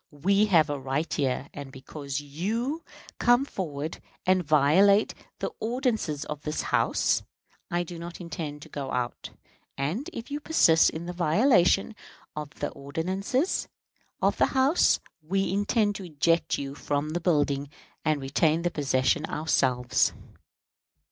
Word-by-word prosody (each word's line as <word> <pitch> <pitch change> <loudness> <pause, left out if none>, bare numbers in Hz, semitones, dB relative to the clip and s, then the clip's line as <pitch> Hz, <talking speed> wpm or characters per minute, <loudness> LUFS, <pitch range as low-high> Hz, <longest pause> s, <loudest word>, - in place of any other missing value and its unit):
We 195 +8 +2
have 165 -6 +5
a 145 - -3
right 135 +5 -2
here; 135 -2 -1
and 140 -2 -8
because 135 +1 -6
you 220 - -3 0.4
come 245 +3 +4
forward 155 - -5 0.2
and 185 0 +3
violate 165 +8 +4 0.2
the - - -3
ordinances 220 - -1
of 150 -1 -6
this 150 0 -3
House, - - +2 0.5
I 175 0 0
do 175 0 -8
not 170 0 -8
intend 155 -4 -6
to - - -13
go 140 -2 -5
out; 125 -1 -3 0.5
and, 165 - -2
if 235 +4 -8
you 290 - -2
persist 170 - +5
in 160 +2 -6
the 175 - -5
violation 185 - +3 0.4
of 150 -1 -5
the - - -3
ordinances 190 - -1 0.6
of - - +3
the - - +4
House, 275 +6 +4 0.2
we 195 +4 -1
intend 205 +1 +2
to 195 - -8
eject 165 +1 +1
you 140 -1 -5
from 145 +1 -2
the 175 +2 -2
building 145 -4 +1 0.3
and 155 -1 +1
retain 155 +4 +1
the 175 - 0
possession 140 +2 +1
ourselves." 130 -5 +1
160 Hz, 140 wpm, -27 LUFS, 145-195 Hz, 0.6 s, have